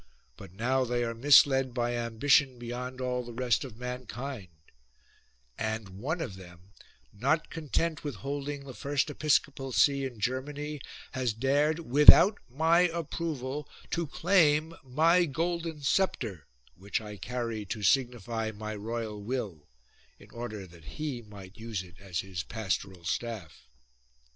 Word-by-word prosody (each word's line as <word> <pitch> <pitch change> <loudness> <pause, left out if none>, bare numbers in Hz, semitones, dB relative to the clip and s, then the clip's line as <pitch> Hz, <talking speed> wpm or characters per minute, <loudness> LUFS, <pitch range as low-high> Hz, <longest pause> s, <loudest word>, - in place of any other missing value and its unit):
But - - -11
now 125 +7 +1
they 120 0 0
are 115 -1 -2
misled 135 0 +5
by 120 -1 0
ambition 125 +3 +3
beyond 125 +2 -6
all 125 -1 -1
the 120 -1 -9
rest 125 -1 +1
of 125 -6 -9
mankind; 125 -2 -6 1.1
and 110 -2 -2
one 135 - -3
of 105 -12 -5
them 90 +1 -14 0.4
not 140 +10 0
content 160 0 -1
with 145 -5 -4
holding 140 +4 -4
the 135 -2 -9
first 140 +3 -1
episcopal 140 -3 +1
see 140 +2 +4
in 125 -4 -5
Germany 145 +5 -3 0.3
has 130 -4 -1
dared 145 +7 +1
without 150 - +8
my 160 +6 +3
approval 150 -4 -4 0.2
to 170 -2 -1
claim 160 -1 +3
my 165 +7 +4
golden 165 0 -2
sceptre, 115 - 0 0.3
which 100 +6 -3
I 105 -2 -8
carry 115 +1 -3
to 105 +2 -4
signify 120 -1 +1
my 110 0 -6
royal 110 0 -4
will, 100 - -4 0.5
in - - -17
order 115 -4 -6
that 85 -3 -16
he 145 -6 -3
might 100 -3 -12
use 110 -4 -4
it 90 +1 -16
as 95 -3 -3
his 95 -3 -5
pastoral 95 -3 -3
staff." 110 -6 -4
125 Hz, 140 wpm, -30 LUFS, 110-145 Hz, 1.1 s, without